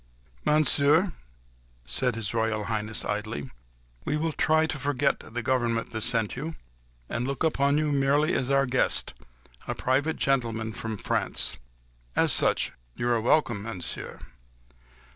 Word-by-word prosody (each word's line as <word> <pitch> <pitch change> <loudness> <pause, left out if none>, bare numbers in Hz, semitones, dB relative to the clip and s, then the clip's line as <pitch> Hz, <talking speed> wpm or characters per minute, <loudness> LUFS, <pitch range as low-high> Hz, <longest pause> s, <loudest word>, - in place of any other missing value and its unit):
"Monsieur," 155 +4 +4 0.7
said 125 - +1
His 110 -2 -3
Royal 110 -2 0
Highness 110 0 -2
coldly, 105 -10 -3 0.5
"we 150 - -1
will 160 +1 0
try 155 +1 +3
to 155 -2 -4
forget 140 +1 +1
the 120 +1 -6
government 120 -2 0
that 110 - -3
sent 115 -2 +1
you, 155 +5 -5 0.5
and 120 +2 -2
look 140 +2 -2
upon 140 -2 +2
you 150 -1 +1
merely 145 +3 +2
as 130 - 0
our 140 0 +3
guest—a 60 - -2
private 140 +5 0
gentleman 115 -5 0
from 110 +2 -4
France. - - 0 0.6
As - - +4
such - - +2 0.2
you 120 - -1
are 120 -2 +2
welcome, 120 -4 +2
Monsieur." 100 -5 -6
125 Hz, 135 wpm, -27 LUFS, 110-145 Hz, 0.7 s, Monsieur